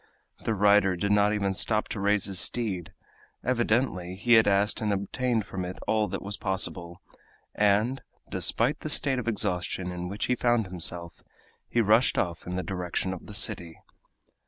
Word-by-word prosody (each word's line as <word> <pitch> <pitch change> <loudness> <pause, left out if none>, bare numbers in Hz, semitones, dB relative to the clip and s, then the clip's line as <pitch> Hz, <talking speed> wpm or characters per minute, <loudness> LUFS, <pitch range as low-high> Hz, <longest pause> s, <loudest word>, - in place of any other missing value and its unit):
The 115 - 0
rider 100 -1 +4
did 100 +4 -1
not 105 0 +3
even 100 -2 0
stop 105 +2 +1
to - - -4
raise 100 0 +2
his 95 -2 +3
steed. 100 -8 -1 0.5
Evidently 115 -7 0
he 120 +5 +2
had 110 -1 +6
asked 100 +1 +2
and 105 -1 0
obtained 110 +3 -1
from 95 -1 -5
it 90 +1 -6
all 110 -1 +1
that - - -5
was 100 +1 -4
possible, 90 -2 -2 0.5
and, 105 +6 +1 0.3
despite 130 +6 +1
the 155 - -5
state 135 -3 +1
of 120 - -6
exhaustion 90 -4 -1
in 90 0 -5
which 100 +3 -3
he - - +1
found 120 -2 +1
himself, 85 -1 -2 0.5
he 120 - +2
rushed 110 +4 +3
off 85 -1 -2
in 90 - -4
the 95 - -2
direction 95 0 -3
of 95 - -10
the 105 - -5
city. 85 -4 +1
100 Hz, 175 wpm, -27 LUFS, 90-110 Hz, 0.5 s, had